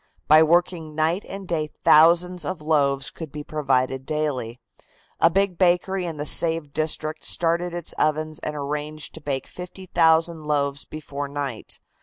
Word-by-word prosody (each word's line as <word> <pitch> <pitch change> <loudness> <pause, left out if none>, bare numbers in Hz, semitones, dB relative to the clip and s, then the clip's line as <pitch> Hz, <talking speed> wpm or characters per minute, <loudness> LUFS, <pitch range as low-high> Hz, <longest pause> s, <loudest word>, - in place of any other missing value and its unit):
By 155 +1 +7
working 165 -1 +1
night 160 +5 0
and 195 -1 -7
day 155 -3 -2
thousands 170 +3 +5
of 185 +3 -4
loaves 140 -3 +1
could 160 -4 -9
be 150 +1 -7
provided 135 -3 0
daily. 135 -6 -3 0.6
A - - +5
big 195 0 0
bakery 180 0 +2
in 160 -2 -5
the 145 - -4
saved 160 -1 +1
district 155 0 -1
started 170 +1 +1
its 175 -2 -5
ovens 155 +1 0
and 150 - -5
arranged 150 +1 -5
to 160 - -9
bake 140 -2 -3
50,000 170 -3 0
loaves 140 -1 -1
before 145 -2 -6
night. 140 -4 -5
155 Hz, 150 wpm, -23 LUFS, 145-170 Hz, 0.6 s, By